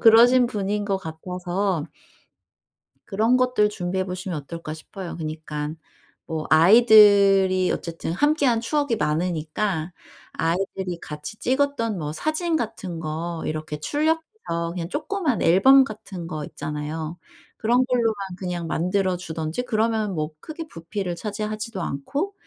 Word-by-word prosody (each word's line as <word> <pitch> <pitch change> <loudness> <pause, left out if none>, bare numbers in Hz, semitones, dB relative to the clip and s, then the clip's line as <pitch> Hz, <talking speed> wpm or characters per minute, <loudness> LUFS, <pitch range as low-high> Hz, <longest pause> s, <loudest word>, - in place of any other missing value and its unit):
그러신 240 +2 +7
분인 205 -2 -2
것 195 -2 +1
같아서 180 +1 -3 1.2
그런 220 +5 +2
것들 250 -4 +3
준비해 190 -2 -2
보시면 180 -2 -4
어떨까 155 +2 -6
싶어요. 175 +3 -8
그러니깐 155 -1 -5 0.5
뭐 160 -1 -4
아이들이 195 0 +6
어쨌든 165 -1 -4
함께한 280 - +2
추억이 285 -1 0
많으니까 160 +2 -1 0.4
아이들이 180 +1 -1
같이 150 +8 -7
찍었던 255 -6 0
뭐 150 -2 -4
사진 315 - -1
같은 215 - -3
거 165 +1 -4
이렇게 155 -1 -3
출력해서 300 - -1
그냥 170 -2 -4
쪼끄만 315 - -1
앨범 265 +11 +7
같은 210 -7 -7
거 155 -2 -4
있잖아요. 155 +3 -5 0.4
그런 245 +3 +3
걸로만 235 -3 +1 0.2
그냥 175 -3 -4
만들어 185 +3 0
주든지 160 +3 -4
그러면 220 -4 0
뭐 155 0 -2
크게 315 - -7
부피를 175 - -4
차지하지도 215 +1 -4
않고 280 - -3
190 Hz, 300 characters per minute, -24 LUFS, 165-230 Hz, 1.2 s, 그러신